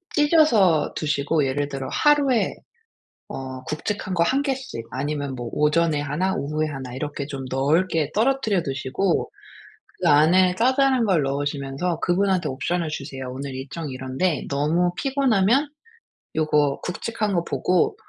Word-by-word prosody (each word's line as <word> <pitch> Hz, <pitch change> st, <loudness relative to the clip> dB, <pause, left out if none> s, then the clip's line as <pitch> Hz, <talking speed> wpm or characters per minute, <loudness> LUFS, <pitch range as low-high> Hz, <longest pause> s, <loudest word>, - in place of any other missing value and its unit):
찢어서 290 Hz, -, +4 dB
두시고 150 Hz, 0 st, 0 dB
예를 145 Hz, +2 st, -1 dB
들어 135 Hz, -1 st, -5 dB
하루에 285 Hz, -5 st, +3 dB, 0.7 s
어 130 Hz, -1 st, -6 dB
굵직한 185 Hz, +6 st, -3 dB
거 170 Hz, -, +2 dB
1 265 Hz, +9 st, +2 dB
개씩 265 Hz, -, -4 dB
아니면 140 Hz, +1 st, -3 dB
뭐 120 Hz, -2 st, -5 dB
오전에 150 Hz, 0 st, +2 dB
1 150 Hz, +7 st, -1 dB
오후에 155 Hz, +2 st, -1 dB
1 130 Hz, -3 st, -7 dB
이렇게 145 Hz, 0 st, -4 dB
좀 135 Hz, -2 st, -6 dB
넓게 155 Hz, +3 st, +1 dB
떨어뜨려 220 Hz, -6 st, +1 dB
두시고 135 Hz, +7 st, -1 dB, 0.7 s
그 175 Hz, -, +2 dB
안에 180 Hz, +5 st, +5 dB
자잘한 260 Hz, +2 st, +3 dB
걸 175 Hz, -8 st, +2 dB
넣으시면서 140 Hz, +4 st, -2 dB
그분한테 185 Hz, -2 st, +1 dB
옵션을 165 Hz, +5 st, -2 dB
주세요. 135 Hz, -3 st, -6 dB
"오늘 135 Hz, +1 st, -6 dB
일정이 140 Hz, +3 st, -6 dB
이런데 130 Hz, +5 st, -2 dB
너무 155 Hz, +5 st, +1 dB
피곤하면 270 Hz, -1 st, +2 dB, 0.7 s
요거 150 Hz, -3 st, +1 dB
굵직한 210 Hz, +2 st, -3 dB
거 170 Hz, -1 st, +1 dB
보고 180 Hz, -2 st, +1 dB
155 Hz, 290 characters per minute, -23 LUFS, 140-195 Hz, 0.7 s, 안에